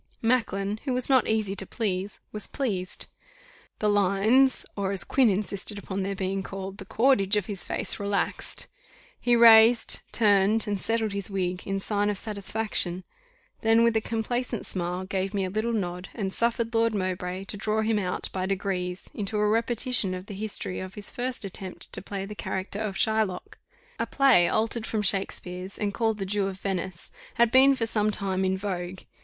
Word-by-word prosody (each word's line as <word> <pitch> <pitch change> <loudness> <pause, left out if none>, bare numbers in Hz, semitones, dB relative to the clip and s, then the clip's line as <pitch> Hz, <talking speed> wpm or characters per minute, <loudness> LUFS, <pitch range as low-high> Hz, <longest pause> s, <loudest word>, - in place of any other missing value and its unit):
Macklin, 215 -4 +1
who 265 - 0
was 255 +2 +1
not 260 -3 +5
asy 215 -3 0
to 195 -1 -3
please, 200 -3 -2
was 210 -1 -4
pleased. 195 -9 -2 0.7
The 210 - 0
lines, 205 +6 +3
or 200 -1 -1
as 190 -3 -1
Quin 255 +5 +3
insisted 200 +1 -1
upon 195 -1 -4
their 195 +1 -2
being 195 +1 -2
called, 195 +1 -7
the - - -8
cordage 220 -5 +3
of 205 - 0
his 200 -3 -4
face - - -2
relaxed. 200 -1 -2 0.5
He 240 -1 +3
raised, 230 0 +7
turned, 210 0 +3
and 205 -2 -2
settled 225 -2 0
his 200 0 -3
wig, 185 -2 -2
in 195 0 -1
sign 205 +1 0
of 205 - -1
satisfaction; 200 -3 -2 0.6
then 225 +1 +4
with 235 -1 +3
a 220 - +3
complacent 230 +1 -2
smile 180 0 -2
gave 195 +1 -2
me 195 -1 +1
a 185 - -4
little 215 +4 -1
nod, 180 -4 -3
and 195 -4 -3
suffered 235 0 0
Lord 225 -1 +2
Mowbray 185 -1 -2
to 200 - -5
draw 215 +1 0
him 220 -1 +1
out 180 -2 -2
by 185 0 -1
degrees 190 -2 -2
into 210 +1 -2
a 210 0 +2
repetition 230 -2 +1
of 185 +1 -7
the 205 - -8
history 200 -2 -3
of 185 0 -7
his 205 -1 -4
first 245 -2 -2
attempt 190 -1 -6
to - - +1
play 195 0 -5
the 210 - -7
character 195 0 -4
of 210 -3 -3
Shylock. 220 -4 0 0.4
A - - -1
play 260 -11 +5
altered 225 +1 0
from 215 -2 -1
Shakespeare's, 190 -1 -2
and 205 -1 -1
called 225 -1 0
"The 195 - -3
Jew 200 0 0
of 190 -1 -5
Venice," 190 -2 -3 0.2
had 235 -1 +4
been 270 +2 +6
for 235 -3 -1
some 215 -1 +1
time 195 -2 0
in 190 0 +1
vogue. 185 -2 -4
205 Hz, 185 wpm, -27 LUFS, 190-225 Hz, 0.7 s, raised